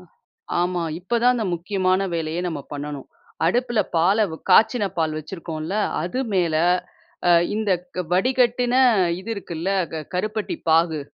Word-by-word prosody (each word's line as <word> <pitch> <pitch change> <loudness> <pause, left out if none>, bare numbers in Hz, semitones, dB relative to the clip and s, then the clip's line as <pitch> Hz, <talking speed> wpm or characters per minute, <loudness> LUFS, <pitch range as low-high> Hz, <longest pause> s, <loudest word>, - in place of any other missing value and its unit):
ஆ. - - -16 0.6
ஆமா 175 0 0 0.2
இப்ப 190 +7 -2
தான் 250 +1 +5
அந்த 225 - -1
முக்கியமான 185 +1 0
வேலையே 165 +1 -2
நம்ம 155 -4 -4
பண்ணனும். 145 -1 -6 0.4
அடுப்பில 240 +4 +1 0.2
பாலை, 190 +7 +4
வ் 160 - -7
காய்ச்சின 220 +4 +5
பால் 155 -1 0
வைச்சிருக்கோம்ல. 160 +1 -6 0.3
அது 180 +10 -2
மேல 175 -4 +1 0.7
அ - - +6 0.2
இந்தக் 185 -5 -2
வடிகட்டின 245 +4 +2 0.5
இது 210 +4 -7
இருக்குல்ல. 175 -3 -4 0.2
க 160 -1 -4
கருப்பட்டி 215 - -2
பாகு 160 -1 +3
180 Hz, 135 wpm, -22 LUFS, 165-215 Hz, 0.7 s, அ